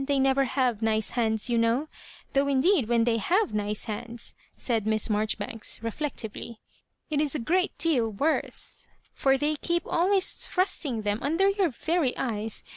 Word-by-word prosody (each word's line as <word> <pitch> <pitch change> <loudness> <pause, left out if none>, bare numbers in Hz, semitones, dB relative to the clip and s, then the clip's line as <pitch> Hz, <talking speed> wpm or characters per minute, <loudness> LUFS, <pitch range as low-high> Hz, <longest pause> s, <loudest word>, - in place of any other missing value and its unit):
They 280 0 0
never 270 0 +3
have 245 -3 0
nice 220 -1 +1
hands, 220 -2 +1
you 235 -1 +1
know, 230 +6 +1 0.2
— - - -22
though 275 +1 +2
indeed 280 - +3
when 235 -1 +3
they 230 -1 +2
have 370 - +1
nice 210 0 -1
hands,'* 230 +2 -6 0.2
said 225 -4 0
M^ 220 +1 +1
Marjoribanks, 215 +1 -1
reflectively, 230 -3 -4 0.5
"it 295 -1 +2
is 300 -1 -1
a - - -1
great 360 +10 +1
deal 250 -9 +2
worse, 285 +10 -2 0.3
for 270 0 +2
they 295 +2 0
keep 345 +3 -1
always 375 +2 +2
thrusting 295 - -1
them 205 +1 0
under 330 +7 +2
your 395 -3 +1
very 310 +1 0
eyes. 220 -3 -2
255 Hz, 165 wpm, -27 LUFS, 225-305 Hz, 0.5 s, never